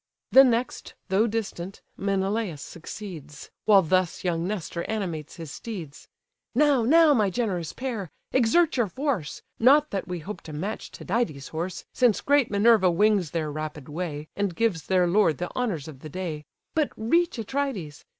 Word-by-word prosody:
The 270 - +9
next, 245 -1 -1
though 200 +5 +3
distant, 200 -4 -4
Menelaus 195 -3 -1
succeeds; 165 -4 -9
While 200 -3 +6
thus 185 +1 +1
young 170 -1 0
Nestor 180 -4 -3
animates 175 -9 -3
his 165 -4 -8
steeds: 175 -10 -8 0.5
"Now, 285 -2 +4
now, 310 +6 +6
my 215 -6 +3
generous 185 -6 -2
pair, 235 -9 -4 0.2
exert 275 +6 +3
your 240 -3 +2
force; 245 - -3 0.2
Not 285 +5 +5
that 195 - -3
we 180 -1 -3
hope 190 +6 -7
to 155 - -8
match 195 +9 -4
Tydides' 175 - -2
horse, 175 +4 -4
Since 240 -6 +3
great 285 -3 +3
Minerva 205 -2 +5
wings 195 -1 +3
their 155 -1 -2
rapid 150 -2 -6
way, 155 -1 -4
And 200 -4 -1
gives 210 -8 0
their 185 -1 +3
lord 175 -4 +3
the 175 - -5
honours 200 - -2
of 145 -4 -10
the 155 - -9
day; 160 -3 -5 0.3
But 310 -3 +1
reach 335 +10 +1
Atrides! 225 - -3
195 Hz, 160 wpm, -26 LUFS, 165-230 Hz, 0.5 s, The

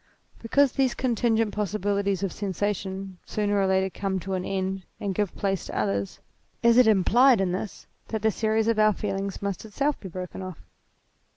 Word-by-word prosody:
Because 270 +4 +3
these 260 -2 +1
contin 235 -2 +1
gent 225 -2 +1
possibilities 200 -1 -1
of 195 - -1
sensation 195 -1 -3
sooner 205 -1 0
or 195 - +2
later 190 0 +2
come 190 +1 -2
to 195 +2 -4
an 185 -1 -1
end 190 0 -2 0.2
and 200 -1 -2
give 205 0 -1
place 195 -3 -1
to - - -5
others, 100 -1 -1 0.4
is 235 0 +6
it 250 - +6
implied 225 +4 +5
in 190 -2 +1
this, 190 +3 -5 0.2
that 220 -2 -3
the 220 - +4
series 220 +1 +1
of 230 -1 +2
our 215 0 +5
feelings 195 -1 -3
must 200 -3 -3
itself 275 +7 -1
be 190 - -8
broken 180 +1 -6
IMMORTALITY 185 -3 -6
203 - - -19
off? - - -35
200 Hz, 195 wpm, -26 LUFS, 190-220 Hz, 0.4 s, is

